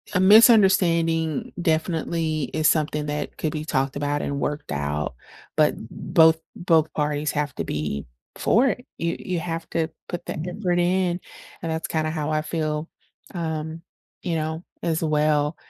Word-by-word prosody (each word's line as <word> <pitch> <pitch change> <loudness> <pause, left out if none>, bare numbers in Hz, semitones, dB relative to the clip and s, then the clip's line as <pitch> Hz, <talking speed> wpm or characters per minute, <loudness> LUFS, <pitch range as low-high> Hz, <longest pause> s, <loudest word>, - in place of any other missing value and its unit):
a - - +4
misunderstanding 185 - +5
definitely 160 -2 0
is 155 0 +2
something 150 -1 0
that 150 0 -4
could 155 - -1
be 155 0 -4
talked 135 -2 0
about 145 0 -1
and 140 0 -2
worked 150 +1 -3
out, 70 0 -2 0.4
but - - +3 0.2
both 160 0 +4 0.2
both 160 -3 +2
parties 150 0 0
have 150 -2 -1
to - - -2
be 75 -2 -3 0.3
for 245 +5 +3
it. 250 +1 -4
You 170 0 -1
you 180 -2 -2
have 165 0 -4
to 165 -1 0 0.2
put 175 - -5
that - - -4
effort 180 -1 0
in, 180 0 +1 0.4
and 165 - -3
that's 160 0 -2
kinda 155 -1 -1
how 155 -1 -2
I 155 0 +1
feel, 155 0 -2 0.5
um, 160 -1 -3 0.4
you 175 - -1
know, 160 +1 -2 0.2
as 165 -1 0
well, 150 -1 +2
160 Hz, 155 wpm, -24 LUFS, 150-170 Hz, 0.5 s, misunderstanding